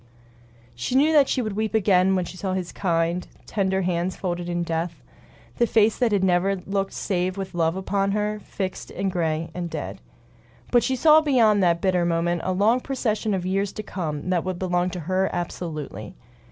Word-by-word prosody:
She 120 - -3
knew 300 +4 +4
that 285 -3 +5
she 255 - +1
would 215 -3 -3
weep 220 0 -1
again 190 -2 +4
when 180 -1 0
she 180 - -9
saw 185 0 -2
the 185 -2 -3
kind, 170 -1 0 0.2
tender 190 -2 0
hands 175 +1 -1
folded 175 -2 -3
in 175 0 -1
death; 165 -3 -3 0.5
the 235 - +3
face 220 -1 +3
that 245 -3 +2
had 200 -2 +2
never 190 +1 +2
looked 195 +1 -3
save 185 0 -1
with 190 -1 -5
love 165 -1 +1
upon 195 +1 0
her, 210 0 -1
fixed 190 -2 -5
and 195 -1 -2
gray 165 -2 -1
and 175 0 -4
dead. - - -6 0.7
But 240 - +5
she 265 - 0
saw 310 +3 +6
beyond 230 -9 +4
that 170 -2 +2
bitter 185 -2 +2
moment 170 0 0
a 185 - 0
long 210 +6 +3
procession 220 -6 -1
of 180 -1 -3
years 195 +1 0
to 215 - -6
come 165 -4 -4
that 175 -2 +1
would 185 -1 -3
belong 180 0 0
to 180 -1 -5
her 185 +4 0
absolutely. 165 -4 -5
185 Hz, 195 wpm, -24 LUFS, 175-210 Hz, 0.7 s, saw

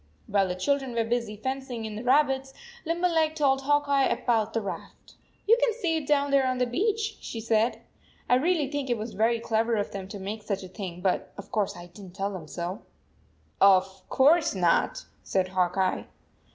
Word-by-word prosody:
While 200 -1 +2
the 180 - -3
children 270 +5 -1
were 230 - +2
busy 230 -2 -2
fencing 260 -1 -4
in 215 -1 -5
the 220 - -6
rabbits, 270 0 +2 0.3
Limberleg 330 -2 +1
told 270 -3 +2
Hawk 290 +1 +2
Eye 275 -1 +3
about 225 -3 0
the 230 - +1
raft. 200 -3 -8 0.2
" - - -38
You 455 - +7
can 465 - +3
see 345 -9 0
it 300 -3 -5
down 285 -1 +2
thereon 260 -2 +3
the 250 - +2
beach," 425 - -1
she 230 - -6
said. 225 +1 +1 0.2
" - - -32
I - - +3
really 315 +1 +1
think 285 -1 -3
it 240 - +1
was 220 +2 -6
very 230 +3 +2
clever 230 0 0
of 205 -1 -2
them 195 -1 -6
to 200 - -7
make 200 +3 -5
such 200 -2 -3
a - - -7
thing, 180 -2 -7
but 190 -1 0
of 200 0 -10
course 210 -6 -1
I 175 - -9
didn 190 +2 -12
t 175 - -18
tell 200 0 -2
them 170 -5 -7
so/ 175 +6 -5 0.4
" - - -37
Of 190 -1 +4
course 295 0 +4
not," 175 -3 +1 0.2
said 185 -1 -1
Hawk 180 0 0
Eye. 190 -1 0
230 Hz, 210 wpm, -27 LUFS, 195-280 Hz, 0.4 s, You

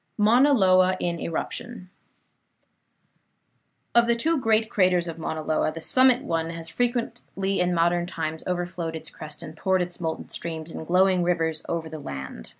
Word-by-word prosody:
MAUNA 240 +7 +5
LOA 185 -4 +4
IN 170 -1 -2
ERUPTION 185 +4 -5 2.0
Of 235 0 +5
the 235 - +3
two 315 +6 +1
great 220 -2 +2
craters 180 -4 +2
of 165 0 -6
Mauna 160 -1 -4
Loa, 155 0 0
the 165 - -7
summit 255 - +4
one 165 - -1
has 165 -1 -5
frequently 230 -4 -2
in 180 0 +2
modern 175 0 +1
times 160 -2 -4
overflowed 175 -2 -3
its 160 - -7
crest 155 +1 -9
and 155 -1 -9
poured 185 +2 +1
its 175 0 -8
molten 160 -1 -3
streams 160 -1 -5
in 160 - -7
glowing 185 +1 +3
rivers 165 -3 0
over 165 -1 -2
the 160 -1 -7
land. 65 - -7
175 Hz, 160 wpm, -25 LUFS, 160-195 Hz, 2.0 s, MAUNA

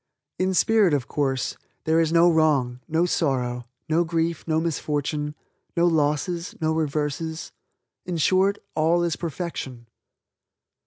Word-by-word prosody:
In 185 0 +1
spirit, 210 -6 +4
of 130 -3 -2
course, 135 -3 -1 0.3
there 160 +1 +2
is 165 -1 +2
no 170 +1 +5
wrong, 150 -7 +2
no 165 +2 +2
sorrow, 125 -8 -1 0.2
no 160 +2 +2
grief, 165 0 -1
no 160 -1 +2
misfortune, 150 -2 -2 0.4
no 170 - +4
losses, 165 +2 0
no 160 -1 +1
reverses. 155 +1 -2 0.5
In 175 -2 -3
short 190 +5 +3 0.2
all 165 +3 +2
is 170 -1 0
perfection. 155 -7 -5
160 Hz, 125 wpm, -24 LUFS, 145-170 Hz, 0.5 s, no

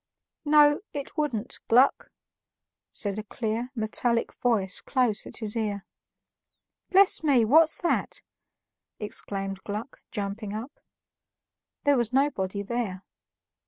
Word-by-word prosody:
"No, 295 0 +6
it 285 -1 -6
wouldn't, 260 -7 -2
Gluck," 255 +4 +4 0.8
said 205 -1 -2
a - - -5
clear, 225 +2 -3
metallic 230 +1 0
voice 205 -7 0
close 245 -6 0
at - - -6
his 215 -2 -3
ear. 205 -3 -2 1.0
"Bless 385 -2 +5
me, 265 -7 +4
what's 315 +7 +5
that?" 345 - 0 0.8
exclaimed 195 -2 -4
Gluck, 215 +5 -6
jumping 205 0 -4
up. 235 +7 -7 1.0
There 285 -2 +4
was 235 -2 0
nobody 205 -8 0
there. 205 -4 -3
230 Hz, 110 wpm, -27 LUFS, 205-275 Hz, 1.0 s, No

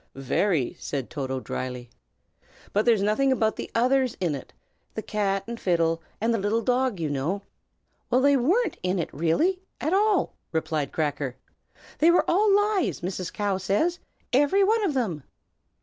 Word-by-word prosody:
"Very!" 135 +2 0
said 135 -4 -4
Toto, 130 -3 -3
dryly. 125 -2 -5 0.8
"But 210 +2 +2
there's 225 -5 +4
nothing 240 +7 +2
about 220 -4 +1
the - - -6
others 255 +1 +2
in 175 -5 0
it, 135 - -7 0.4
the 220 - -4
cat 195 -2 -1
and 235 0 -6
fiddle, 165 -2 +1 0.2
and 230 +2 +1
the 225 - 0
little 210 +3 0
dog, 250 -4 +1
you 160 - -1
know." 150 +8 -2 0.7
"Well, 250 - +3
they 280 +1 +5
weren't 350 - +1
in 185 +1 0
it 170 - -3
really, 315 - +1 0.2
at 310 +5 -1
all!" 410 -1 +2 0.2
replied 155 -3 -1
Cracker. 145 -4 -2 0.6
"They 320 - +6
were 345 - +4
all 405 +4 +3
lies, 410 -1 +2
Mrs. 180 -1 -4
Cow 200 -2 -1
says, 260 - 0 0.3
every 290 +9 +4
one 440 +2 +3
of 330 -8 0
them." 195 - -1
210 Hz, 165 wpm, -26 LUFS, -, 0.8 s, They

